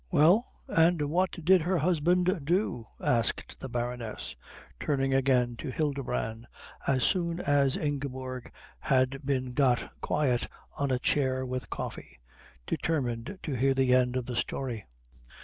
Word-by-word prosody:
"Well, 175 - +5 0.2
and 165 +1 +4
what 185 +3 +2
did 185 0 +6
her 180 +3 +1
husband 175 +2 +2
do?" 165 - 0
asked 115 -2 0
the 135 - -6
Baroness, 120 -2 -4 0.4
turning 135 -2 0
again 125 -3 +2
to - - -5
Hildebrand 130 -6 -2 0.4
as 130 -3 +3
soon 170 +1 +1
as 140 -3 +2
Ingeborg 130 -4 -4 0.3
had 135 +1 +1
been 130 -2 -1
got 125 -2 +2
quiet 130 -5 +1 0.3
on 140 -1 -1
a 130 - +2
chair 130 0 +1
with 130 -1 -4
coffee, - - -6 0.5
determined 130 +1 -2
to 150 - -3
hear 135 +2 +2
the 130 -1 +3
end 125 -1 +3
of 125 - -2
the 125 - -4
story. 120 - -3
135 Hz, 135 wpm, -29 LUFS, 125-155 Hz, 0.5 s, did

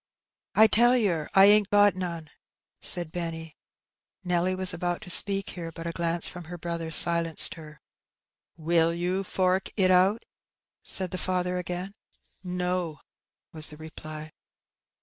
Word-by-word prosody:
'' - - -63
^' - - +2
I 220 - +9
tell 240 +3 +4
yer 175 -10 -1
I 195 0 +8
ain't 205 0 +5
got 205 -1 +5
none," 170 -4 -6 0.5
said 175 -3 -2
Benny. 165 -2 -6 0.7
Nelly 180 +1 0
was 185 0 0
about 175 +1 -3
to 180 - +2
speak 195 +2 +2
here, 165 -2 -7
but 165 +1 -9
a 170 - -2
glance 170 0 -1
from 175 -2 -9
her 175 +2 -8
brother 170 -1 -5
silenced 165 0 +4
her. 150 -2 -13 0.8
Will 165 +1 +1
you 180 +3 -2
fork 185 0 0
it 185 -2 +3
out?" 190 +5 +3 0.6
said 185 -2 -4
the 185 - -4
father 180 0 -1
again. 180 +2 -6 0.5
No," 180 -3 -3 0.5
was 155 -1 0
the 150 - -11
reply. 155 0 -9
175 Hz, 150 wpm, -26 LUFS, 165-185 Hz, 0.8 s, I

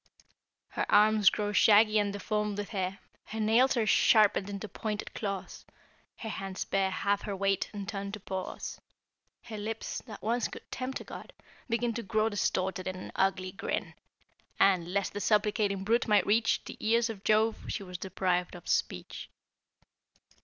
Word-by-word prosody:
"'Her - - -2
arms 210 -1 +6
grow 205 -1 -2
shaggy 215 +1 +6
and 205 -1 0
deformed 210 0 -2
with 205 -1 -4
hair, 190 -2 -2 0.3
Her 220 - -6
nails 235 +5 +4
are 225 - +2
sharpened 210 -2 +4
into 200 +1 -5
pointed 210 0 -4
claws, 195 -3 -5 0.5
Her 220 - -6
hands 195 -2 -4
bear 195 -1 +1
half 200 +2 0
her 200 - -4
weight, 195 0 0
and 200 -2 -6
turn 200 -1 -4
to 215 - -5
paws; 190 -1 -5 0.6
Her 215 -2 -7
lips, 220 +2 -4
that 215 - -10
once 235 +2 +1
could - - -10
tempt 260 +1 -4
a - - -8
god, - - -10 0.4
begin 235 0 0
To 235 - -3
grow 215 +1 +1
distorted 190 -3 -1
in 185 - -3
an 185 - -8
ugly 190 -1 +1
grin; 195 - -3 0.7
And, 180 -3 +3
lest 200 0 -1
the 205 - -4
supplicating 205 -1 +1
brute 230 +4 +2
might 210 -3 +4
reach 220 +2 +2
The - - -9
ears 230 +1 +2
of 200 -3 -10
Jove, 220 +1 +2
she - - -3
was 180 -2 -7
deprived 180 -2 -1
of 175 - -12
speech.' - - -2
205 Hz, 165 wpm, -30 LUFS, 195-220 Hz, 0.7 s, arms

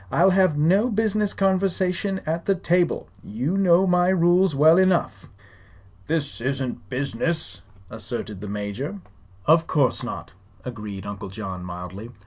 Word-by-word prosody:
"I'll 190 - +4
have 185 -5 +3
no 190 +10 +3
business 215 -2 0
conversation 190 0 0
at 165 +2 -3
the 195 - +3
table. 175 0 0 0.2
You 130 - -2
know 190 -1 +4
my 180 -1 +3
rules 180 -1 +3
well 160 +5 +6
enough." 180 - +1 0.8
"This 150 -6 -2
isn't 130 -4 -3
business," 140 +6 -2 0.3
asserted 110 -1 -6
the 105 - -6
Major. 105 - -5 0.4
"Of 165 +1 +4
course 140 -4 +1
not," - - -7 0.3
agreed 105 -5 -7
Uncle 100 0 -6
John, 95 -2 -6
mildly. 90 +5 -7
160 Hz, 130 wpm, -23 LUFS, -, 0.8 s, well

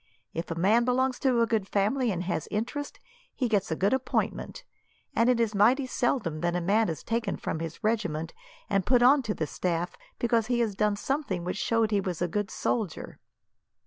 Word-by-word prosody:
If 165 - -4
a 165 - -2
man 205 +8 +3
belongs 255 +1 +1
to 250 -3 +2
a - - +4
good 220 -4 0
family, 220 +6 +1
and 180 -3 -2
has 175 -4 -2
interest, 245 +7 -3 0.4
he 255 - 0
gets 205 -4 +1
a 160 - 0
good 195 +7 +2
appointment; 265 - -2 0.5
and 230 +2 +4
it 245 -2 +3
is 225 -2 +1
mighty 245 +7 +4
seldom 225 - -1
that 175 0 0
a - - +1
man 205 +5 +2
is 160 -1 -5
taken 225 -3 -1
from 155 - -3
his 165 +5 -6
regiment, 180 -8 -1 0.3
and 195 -1 +1
put 245 +3 +3
on 270 +3 +6
to 220 -4 -3
the 155 - -1
staff, 175 +2 -2 0.2
because 230 -2 +1
he 245 -1 +1
has 220 -3 0
done 210 +1 +1
something 215 - -2
which 180 +3 -3
showed 225 0 +1
he 205 -1 +2
was 180 -4 -3
a 175 - +1
good 205 +3 -2
soldier." 210 -9 -3
210 Hz, 205 wpm, -28 LUFS, 180-240 Hz, 0.5 s, on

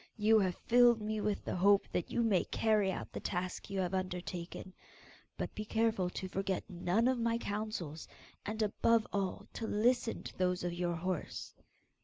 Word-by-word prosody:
You 220 +1 +5
have 185 -3 +1
filled 240 -1 +6
me 215 0 -2
with 205 -1 -1
the - - -2
hope 200 +2 +4
that 180 - -1
you 235 - +1
may 205 -6 +3
carry 210 -3 +2
out - - -5
the - - -5
task 180 +1 -3
you 195 - -2
have 180 0 -2
undertaken, 180 0 -4 0.6
but - - -3
be 215 - -4
careful 220 -4 +1
to 185 - -5
forget 195 0 -2
none 185 +4 +1
of 260 -1 +2
my 230 0 +1
counsels, 205 -8 -4 0.4
and 215 +1 -2
above 220 +1 +3
all 195 -2 -2
to 225 - -4
listen 235 +3 +1
to - - -8
those 180 -1 +1
of 175 -1 -1
your 175 0 -1
horse. 180 0 -4
200 Hz, 180 wpm, -34 LUFS, 180-220 Hz, 0.6 s, filled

